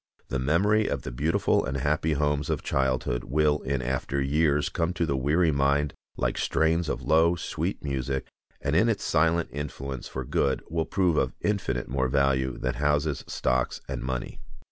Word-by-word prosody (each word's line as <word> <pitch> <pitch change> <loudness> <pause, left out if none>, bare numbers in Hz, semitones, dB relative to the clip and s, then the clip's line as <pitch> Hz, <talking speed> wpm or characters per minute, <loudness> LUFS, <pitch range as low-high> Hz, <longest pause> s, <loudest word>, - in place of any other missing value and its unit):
The 65 - -1
memory 100 +10 +2
of - - -2
the 65 - -5
beautiful 75 +7 +1
and 65 +2 -2
happy 75 +3 +1
homes 75 0 0
of - - -1
childhood 65 -2 0
will 75 +2 +2
in 65 -1 -2
after 65 +2 -1
years 75 +1 +2
come 85 +2 -1
to 85 - 0
the 70 -3 0
weary 75 +6 +2
mind 70 0 +1 0.2
like - - -1
strains 80 0 +1
of - - -3
low, 80 +2 +4
sweet 85 - -3
music, 65 -1 -2 0.3
and 70 +2 -1
in 115 +7 +4
its 110 - -1
silent 85 +1 +2
influence 70 -2 -5
for 65 -1 -5
good 70 +2 0
will 80 0 -1
prove 90 -5 +1
of 65 -2 0
infinite 90 -12 -1
more 65 0 0
value 65 -1 +1
than - - -1
houses, 75 +2 0
stocks, 65 0 0
and - - -4
money. 65 -1 -4
70 Hz, 175 wpm, -27 LUFS, 65-80 Hz, 0.3 s, low